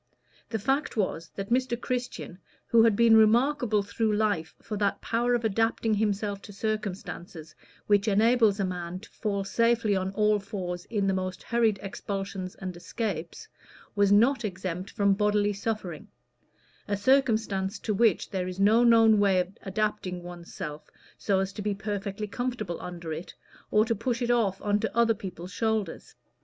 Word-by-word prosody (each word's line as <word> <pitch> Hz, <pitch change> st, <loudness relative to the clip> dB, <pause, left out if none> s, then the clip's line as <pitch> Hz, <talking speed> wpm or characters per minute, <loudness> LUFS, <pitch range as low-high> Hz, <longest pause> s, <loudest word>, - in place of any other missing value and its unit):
The 225 Hz, -, -1 dB
fact 270 Hz, +6 st, -1 dB
was 165 Hz, -5 st, -1 dB
that 195 Hz, +2 st, -5 dB
Mr. 245 Hz, -1 st, +1 dB
Christian, 245 Hz, -8 st, -4 dB, 0.3 s
who 230 Hz, -, +5 dB
had 225 Hz, -2 st, +5 dB
been 230 Hz, +1 st, +6 dB
remarkable 225 Hz, 0 st, +4 dB
through 215 Hz, +2 st, -1 dB
life 205 Hz, -7 st, 0 dB
for 215 Hz, -, -6 dB
that 200 Hz, -1 st, 0 dB
power 240 Hz, +1 st, +1 dB
of 235 Hz, -1 st, -1 dB
adapting 225 Hz, +1 st, +1 dB
himself 205 Hz, -1 st, -1 dB
to 205 Hz, -, -11 dB
circumstances 190 Hz, -6 st, -5 dB, 0.3 s
which 205 Hz, 0 st, +3 dB
enables 220 Hz, 0 st, +4 dB
a 195 Hz, -, +1 dB
man 180 Hz, -1 st, -4 dB
to 225 Hz, -, -14 dB
fall 200 Hz, -2 st, -2 dB
safely 230 Hz, 0 st, +2 dB
on 190 Hz, 0 st, -1 dB
all 210 Hz, 0 st, +3 dB
fours 180 Hz, -3 st, -5 dB
in 205 Hz, -3 st, -1 dB
the 195 Hz, -, +2 dB
most 185 Hz, -1 st, -3 dB
hurried 230 Hz, -3 st, +2 dB
expulsions 195 Hz, -1 st, -5 dB
and 185 Hz, -4 st, -6 dB
escapes, 180 Hz, -, -5 dB, 0.5 s
was 200 Hz, -1 st, +3 dB
not 240 Hz, +6 st, +4 dB
exempt 185 Hz, -2 st, -4 dB
from 200 Hz, -2 st, +2 dB
bodily 205 Hz, 0 st, +2 dB
suffering 200 Hz, -6 st, -4 dB, 0.8 s
a 205 Hz, -1 st, 0 dB
circumstance 220 Hz, -5 st, +2 dB
to 215 Hz, -, -2 dB
which 215 Hz, -2 st, +2 dB
there 185 Hz, -2 st, -2 dB
is 185 Hz, +1 st, -6 dB
no 215 Hz, +4 st, +5 dB
known 225 Hz, -2 st, +6 dB
way 195 Hz, -2 st, +4 dB
of 180 Hz, +2 st, -3 dB
adapting 195 Hz, -3 st, -2 dB
one's 175 Hz, -1 st, -10 dB
self 150 Hz, -1 st, -7 dB, 0.3 s
so 200 Hz, -2 st, 0 dB
as 195 Hz, 0 st, -3 dB
to 210 Hz, -, -6 dB
be 205 Hz, 0 st, -1 dB
perfectly 205 Hz, 0 st, -4 dB
comfortable 215 Hz, -5 st, -4 dB
under 170 Hz, -2 st, -6 dB
it, 165 Hz, +3 st, -8 dB, 0.3 s
or 215 Hz, +1 st, +4 dB
to 230 Hz, -, +1 dB
push 240 Hz, +2 st, -2 dB
it 240 Hz, -, +1 dB
off 210 Hz, -6 st, +1 dB
on 205 Hz, 0 st, +2 dB
to 220 Hz, +1 st, -3 dB
other 230 Hz, -1 st, +4 dB
people's 185 Hz, -3 st, -8 dB
shoulders. 220 Hz, -5 st, -2 dB
205 Hz, 170 wpm, -27 LUFS, 190-225 Hz, 0.8 s, been